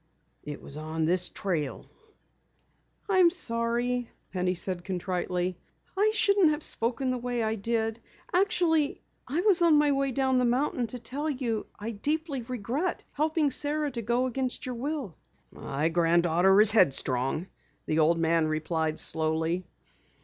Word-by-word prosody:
It 150 Hz, -, -8 dB
was 140 Hz, -, -10 dB
on 155 Hz, +1 st, -2 dB
this 180 Hz, +2 st, +2 dB
trail 160 Hz, -8 st, -3 dB, 0.6 s
" -, -, -42 dB
"I'm 370 Hz, -3 st, +5 dB
sorry," 240 Hz, -5 st, -1 dB, 0.2 s
Penny 180 Hz, 0 st, 0 dB
said 180 Hz, 0 st, -3 dB
contritely. 180 Hz, -1 st, -2 dB, 0.4 s
"I 415 Hz, +3 st, +3 dB
shouldn't 400 Hz, -5 st, +4 dB
have 300 Hz, 0 st, -1 dB
spoken 250 Hz, +3 st, +1 dB
the 250 Hz, -, -2 dB
way 245 Hz, -1 st, -2 dB
I 220 Hz, 0 st, 0 dB
did. 225 Hz, +1 st, -2 dB, 0.3 s
Actually, 350 Hz, -6 st, +2 dB, 0.2 s
I 295 Hz, +7 st, -1 dB
was 380 Hz, -3 st, +4 dB
on 330 Hz, -3 st, +5 dB
my 295 Hz, -1 st, +3 dB
way 275 Hz, -1 st, 0 dB
down 260 Hz, 0 st, +1 dB
the 250 Hz, -, +2 dB
mountain 245 Hz, 0 st, 0 dB
to 250 Hz, -, -6 dB
tell 275 Hz, +6 st, -4 dB
you 250 Hz, -6 st, -2 dB
I 220 Hz, +3 st, -5 dB
deeply 290 Hz, +5 st, -2 dB
regret 250 Hz, -, -3 dB
helping 310 Hz, -1 st, +1 dB
Sara 295 Hz, +1 st, 0 dB
to 240 Hz, -2 st, -4 dB
go 240 Hz, +3 st, 0 dB
against 255 Hz, 0 st, -3 dB
your 255 Hz, -, -3 dB
will." 265 Hz, -, -4 dB, 0.4 s
"My 145 Hz, +3 st, -2 dB
granddaughter 175 Hz, +3 st, +3 dB
is 215 Hz, 0 st, +7 dB
headstrong," 135 Hz, -, +2 dB, 0.4 s
the 155 Hz, -, 0 dB
old 160 Hz, +2 st, +4 dB
man 165 Hz, -1 st, +2 dB
replied 155 Hz, 0 st, -1 dB
slowly. 160 Hz, +3 st, -1 dB
230 Hz, 150 wpm, -28 LUFS, 175-285 Hz, 0.6 s, is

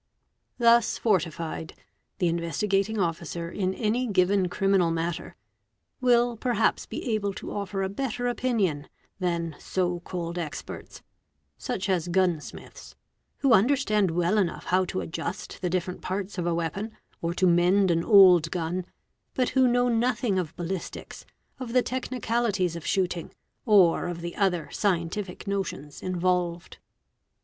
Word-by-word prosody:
Thus 235 Hz, -1 st, +4 dB
fortified, 165 Hz, -6 st, -1 dB, 0.4 s
the 180 Hz, -, +1 dB
Investigating 195 Hz, +6 st, 0 dB
Officer 170 Hz, -1 st, -2 dB
in 190 Hz, -2 st, -1 dB
any 235 Hz, +3 st, 0 dB
given 190 Hz, -2 st, +2 dB
criminal 195 Hz, -2 st, +2 dB
matter, 165 Hz, +1 st, -3 dB, 0.6 s
will 240 Hz, -2 st, +3 dB
perhaps 230 Hz, -2 st, +1 dB
be 240 Hz, -, -3 dB
able 200 Hz, -2 st, -1 dB
to -, -, -7 dB
offer 200 Hz, -1 st, -3 dB
a -, -, 0 dB
better 245 Hz, +3 st, -3 dB
opinion 215 Hz, -, 0 dB, 0.3 s
than 170 Hz, -3 st, -1 dB
so 180 Hz, -2 st, -1 dB
called 170 Hz, 0 st, -5 dB
experts, 160 Hz, -4 st, -7 dB, 0.5 s
such 195 Hz, -, -3 dB
as 180 Hz, -3 st, 0 dB
gunsmiths, 175 Hz, -3 st, -2 dB, 0.5 s
who 275 Hz, -3 st, +4 dB
understand 215 Hz, -4 st, +3 dB
well 175 Hz, +5 st, +1 dB
enough 180 Hz, -4 st, -1 dB
how 185 Hz, +1 st, +2 dB
to 185 Hz, +1 st, -3 dB
adjus 165 Hz, -, -4 dB
the 180 Hz, -, -5 dB
different 180 Hz, 0 st, -2 dB
parts 190 Hz, 0 st, -4 dB
of 175 Hz, -, -1 dB
a 170 Hz, -, +1 dB
weapon, 190 Hz, +7 st, -3 dB, 0.2 s
or 170 Hz, +1 st, -2 dB
to 185 Hz, -, +2 dB
mend 180 Hz, +2 st, +4 dB
an 165 Hz, 0 st, +1 dB
old 185 Hz, -6 st, +7 dB
gun, 175 Hz, +1 st, -3 dB, 0.5 s
but 255 Hz, -1 st, +1 dB
who 260 Hz, -1 st, +4 dB
knoy 245 Hz, -1 st, +2 dB
nothing 235 Hz, -4 st, +1 dB
of 165 Hz, -4 st, -4 dB
ballistics, 175 Hz, +1 st, -6 dB, 0.3 s
of 245 Hz, -3 st, -6 dB
the 250 Hz, -1 st, +4 dB
technicalities 235 Hz, -7 st, -1 dB
of 170 Hz, -, -7 dB
shooting, 180 Hz, -3 st, -1 dB, 0.4 s
or 190 Hz, -6 st, +5 dB
of 175 Hz, -1 st, -5 dB
the 170 Hz, 0 st, -5 dB
ot 195 Hz, -2 st, +3 dB
ne 170 Hz, -3 st, -4 dB
scientific 180 Hz, 0 st, -2 dB
notions 190 Hz, -8 st, -4 dB
involved. 180 Hz, -1 st, -1 dB
185 Hz, 140 wpm, -27 LUFS, 170-215 Hz, 0.6 s, old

